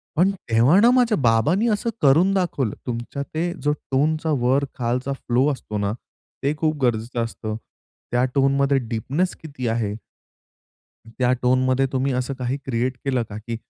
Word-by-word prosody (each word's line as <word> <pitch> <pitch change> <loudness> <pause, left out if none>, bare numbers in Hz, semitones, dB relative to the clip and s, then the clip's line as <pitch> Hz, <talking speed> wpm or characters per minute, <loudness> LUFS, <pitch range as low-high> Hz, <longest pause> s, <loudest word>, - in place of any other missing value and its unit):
पण 180 +5 +4 0.2
तेव्हा 120 - +5
ना 235 +2 +6
माझ्या 245 -4 +3
बाबांनी 140 - +2
असं 215 +2 0
करून 160 +8 +5
दाखवलं 170 - -1
तुमच्या 120 +4 -4
ते 170 +2 0
जो 150 - +2 0.2
टोनचा 155 +4 +1
वर 130 +4 +2
खालचा 125 +3 -1
फ्लो 130 0 +1
असतो 105 -6 -5
ना 100 0 -1 0.5
ते 140 +2 +2
खूप 155 0 0
गरजेचं 120 0 0
असतं. 110 -1 -5 0.6
त्या 125 +1 +2
टोनमध्ये 140 0 +3
डीपनेस 135 - -1
किती 140 -6 -5
आहे? 110 -3 -1 1.1
त्या 125 +2 0
टोनमध्ये 130 +1 +2
तुम्ही 130 0 0
असं 125 +2 -2
काही 125 +2 -1
क्रिएट 125 0 -1
केलं 130 -3 +1
का? 105 - -6
की 115 +2 -5
130 Hz, 155 wpm, -22 LUFS, 120-150 Hz, 1.1 s, ना